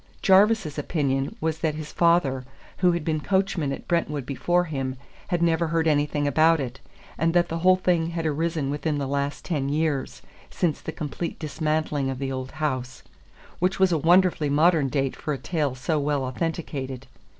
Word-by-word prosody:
Jarvis's 195 -5 +4
opinion 140 -3 -1
was 160 0 -1
that 155 -2 0
his 155 -1 -7
father, 170 -7 +2 0.3
who 180 -1 +4
had 170 -3 -3
been 155 -1 0
coachman 190 -4 0
at - - -6
Brentwood 150 -6 -1
before 175 +6 +1
him, 135 -6 -3 0.3
had 175 -3 0
never 165 0 +2
heard 165 0 +1
anything 145 -1 +1
about 160 +3 +4
it, 130 -2 -5 0.4
and 165 +1 +1
that 175 0 +3
the 165 - -2
whole 185 +2 +5
thing 175 -3 +1
had 165 -1 -3
arisen 155 -2 -1
within 150 +1 -1
the 140 - -2
last 140 +1 -2
ten 145 -6 -1
years, 150 -2 -1 0.3
since 165 -5 -1
the - - -5
complete 160 +2 -5
dismantling 155 -2 -1
of 135 - -3
the 135 0 -3
old 130 0 -5
house; 130 -5 -3 0.6
which 185 +2 +1
was 190 -1 +4
a 165 - +3
wonderfully 175 -1 +3
modern 155 -1 +3
date 135 -1 -1
for 150 - -3
a - - -6
tale 145 0 -2
so 150 +4 -1
well 145 -1 0
authenticated. 135 -2 -4
155 Hz, 180 wpm, -25 LUFS, 140-170 Hz, 0.6 s, whole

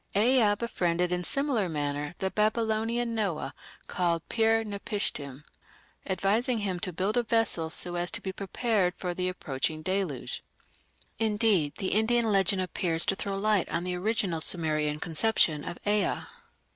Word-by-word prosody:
Ea 220 -1 +4
befriended 180 -6 0
in 180 0 -1
similar 270 -6 0
manner 145 0 -3
the 190 0 -2
Babylonian 225 +2 +1
Noah, 200 -8 -1 0.3
called 170 -2 -1
Pir 225 0 +3
napishtim, 200 -9 -3 0.6
advising 210 +6 +1
him 195 -4 -2
to 180 - -3
build 190 +6 -1
a - - +5
vessel 225 -8 +1
so 175 +2 +1
as 175 0 -1
to - - -2
be 190 - -5
prepared 200 -1 0
for 180 -1 -3
the 180 +1 -1
approaching 155 -2 -3
Deluge. 185 -8 -2 0.8
Indeed 210 -9 +2
the 190 - -1
Indian 230 +3 +3
legend 195 -1 +2
appears 170 -2 +1
to 195 - +1
throw 195 0 -3
light 210 -1 +1
on 170 - -1
the 180 0 -1
original 190 -3 -1
Sumerian 155 -3 0
conception 165 -3 +1
of 175 - -6
Ea. 205 -1 +1
190 Hz, 145 wpm, -28 LUFS, 170-220 Hz, 0.8 s, a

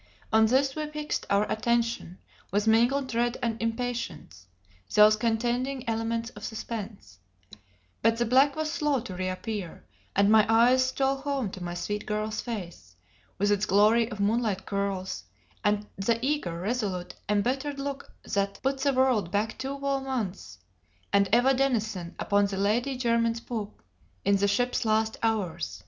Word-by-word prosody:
On 220 0 +6
this 265 +3 +2
we 305 -1 -3
fixed 300 0 -4
our 200 +1 +3
attention 230 -4 0 0.3
with 205 +1 0
mingled 240 +5 +3
dread 240 0 0
and 230 -1 -1
impatience, 230 - -4 0.5
those 210 0 +7
contending 240 +4 -1
elements 230 +1 -1
of 210 - -12
suspense; 210 - -6 0.8
but 225 +1 +3
the 240 - +1
black 265 +4 +4
was 310 0 -2
slow 295 -3 +1
to 190 - -7
reappear; 185 +1 -4 0.3
and 200 +1 +4
my 220 -1 +7
eyes 250 +3 +5
stole 270 +1 0
home 270 -6 -2
to 185 - -7
my 175 0 -4
sweet 205 +3 -4
girl's 215 0 -2
face, 175 - -7 0.4
with 205 +1 +2
its 205 0 +1
glory 215 +4 +4
of 210 - -7
moonlit 210 -1 0
curls, 195 - -3 0.4
and 210 0 +1
the 225 +4 +1
eager, 270 - -1
resolute, 195 -3 -2 0.2
embittered 265 +8 0
look 275 0 -5
that 200 0 -1
put 270 +1 0
the 280 0 +2
world 255 -8 +2
back 210 +4 -1
two 270 +1 -3
whole 275 -1 -1
months, 250 -8 -4 0.6
and 200 -1 +4
Eva 245 +4 +5
Denison 220 -9 -1
upon 200 0 +2
the 195 -1 -4
Lady 240 +7 +1
Jermyn's 230 -2 +1
poop, 220 -4 -6 0.4
in 200 0 +4
the 200 +1 +2
ship's 245 +5 +1
last 220 0 +1
hours. 175 - -1
225 Hz, 155 wpm, -27 LUFS, 200-250 Hz, 0.8 s, those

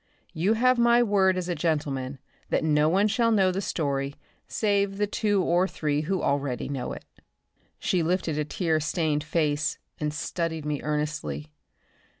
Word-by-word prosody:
You 185 +7 +2
have 255 +2 +3
my 235 0 +5
word 195 -4 +3
as 180 -1 -2
a 180 - 0
gentleman 145 -5 -1 0.3
that - - +1
no 150 -1 +3
one 195 +5 +3
shall 230 +2 +2
know 195 -4 +4
the 190 +2 -2
story 140 -6 -2 0.3
save 200 -2 0
the 205 - +2
two 205 -2 +1
or 175 +2 +2
three 150 -5 -1
who 180 +4 -1
already 140 -4 -1
know 135 -3 -3
it." - - -8 0.7
She 180 - 0
lifted 165 -1 0
her 150 - 0
tear 160 +1 0
stained 155 -1 0
face 150 -2 0 0.2
and 150 -1 -1
studied 160 +1 -3
me 150 -1 -2
earnestly. 150 - -3
160 Hz, 160 wpm, -26 LUFS, 150-195 Hz, 0.7 s, my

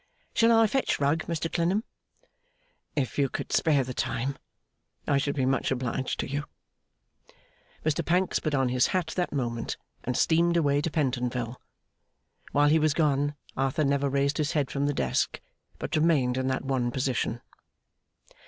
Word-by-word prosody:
'Shall 230 0 +4
I 225 0 +6
fetch 265 +5 0
Rugg, 145 +3 +1
Mr 165 -1 -1
Clennam?' 180 +5 +1 1.1
'If 140 -1 -1
you 140 -1 +3
could - - -5
spare 150 -4 +3
the 125 0 -5
time, 135 +3 -2 0.7
I 140 -1 +3
should 140 +1 -1
be 135 -3 +1
much 135 +1 +1
obliged 130 0 -2
to - - -4
you.' 145 +2 -3 1.4
Mr 155 +2 +1
Pancks 180 +3 +1
put 155 -2 -1
on 135 -2 +2
his 125 0 +3
hat 180 - -2
that 180 -1 -1
moment, 120 -5 -2 0.3
and 125 0 -1
steamed 170 +1 +3
away 145 -3 +2
to 165 - -1
Pentonville. 125 -5 -1 0.9
While 145 +1 +4
he 160 +2 +5
was 155 -1 +2
gone 145 -2 +1 0.2
Arthur 135 +3 0
never 140 0 +1
raised 140 +2 +1
his 150 +2 0
head 145 -4 0
from 140 0 0
the 145 - +1
desk, - - 0 0.4
but 160 - -3
remained 150 -6 +3
in 130 0 -1
that 130 0 -1
one 130 -3 0
position. 125 -2 -1
140 Hz, 160 wpm, -27 LUFS, 130-155 Hz, 1.4 s, I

